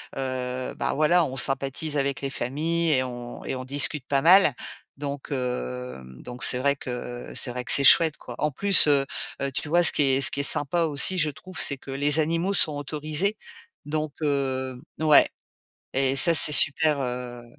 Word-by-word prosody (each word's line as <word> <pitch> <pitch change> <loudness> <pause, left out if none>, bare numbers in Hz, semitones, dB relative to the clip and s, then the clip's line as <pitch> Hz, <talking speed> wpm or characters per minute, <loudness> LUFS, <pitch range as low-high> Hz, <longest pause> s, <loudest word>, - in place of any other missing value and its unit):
heu, 130 -1 -5
bah - - -3
voilà, 160 +4 +2
on 130 - -7
sympathise 140 +3 -1
avec 140 -1 -3
les 140 - -4
familles 155 +7 -2
et 130 -3 +1
on 120 -1 -9
et - - -4
on 130 - -7
discute 140 0 0
pas 140 -1 0
mal, 180 -4 +5 0.4
donc 140 -1 -7
hem 65 - -6
donc 125 0 -7
c'est 125 - +5
vrai 140 +1 0
que, 125 -2 -8
heu, - - -11
c'est - - 0
vrai 125 0 -6
que - - -2
c'est 140 - +3
chouette, 160 +2 +5
quoi. 120 - -11
En 150 0 -2
plus, 200 +7 +4
heu 140 -2 +2 0.4
heu, 140 0 -3
tu 150 - -5
vois? 175 +2 +2
Ce 170 - +7
qui 145 - 0
est 135 0 +1
ce - - +7
qui 140 - -3
est - - -4
sympa 145 +5 +2
aussi, 160 +4 +2
je 155 -3 +1
trouve, 180 +5 -13
c'est 140 - +3
que 135 - -12
les 145 +3 0
animaux 165 +5 -1
sont 155 -5 +4
autorisés, 155 +8 -3 0.5
donc 155 0 -4
heu 130 -3 -3 0.2
ouais 155 -2 +4 0.7
et 135 0 0
ça, 165 +4 +6
c'est 155 - +7
super, 145 +1 +3
heu 125 -1 -6
140 Hz, 200 wpm, -24 LUFS, 130-155 Hz, 0.7 s, Ce